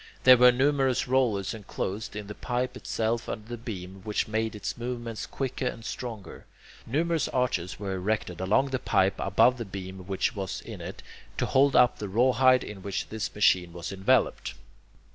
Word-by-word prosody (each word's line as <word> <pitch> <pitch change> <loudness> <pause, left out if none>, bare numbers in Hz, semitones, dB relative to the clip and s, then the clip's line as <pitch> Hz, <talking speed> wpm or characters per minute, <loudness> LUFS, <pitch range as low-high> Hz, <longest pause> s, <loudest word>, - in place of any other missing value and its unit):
There 130 0 +9
were 125 +1 +8
numerous 135 0 +2
rollers 120 -7 +1
enclosed 105 0 -5
in 105 0 -5
the 105 - -7
pipe 125 +3 -2
itself 115 -2 -2
under 105 0 -5
the 120 - -5
beam, 95 -5 -7
which 105 0 -1
made 110 0 -1
its 105 - -4
movements 120 -2 -5
quicker 130 -1 -3
and 115 -2 -5
stronger. 115 -6 -7 0.4
Numerous 160 +3 0
arches 120 -10 -1
were 100 -2 -3
erected 95 -2 -2
along 110 +9 +2
the 130 - 0
pipe 95 -4 +2
above 125 +6 +3
the - - -2
beam 95 -2 -8
which 100 +5 -1
was 95 -2 -4
in - - -9
it, - - -8 0.3
to - - +1
hold 135 +1 +3
up 125 - +5
the 105 - -4
rawhide 130 +4 +4
in 100 -2 -8
which 100 0 -4
this 110 0 -4
machine 90 -4 +3
was 85 -1 -6
enveloped. 100 +6 +1
110 Hz, 175 wpm, -27 LUFS, 95-125 Hz, 0.4 s, There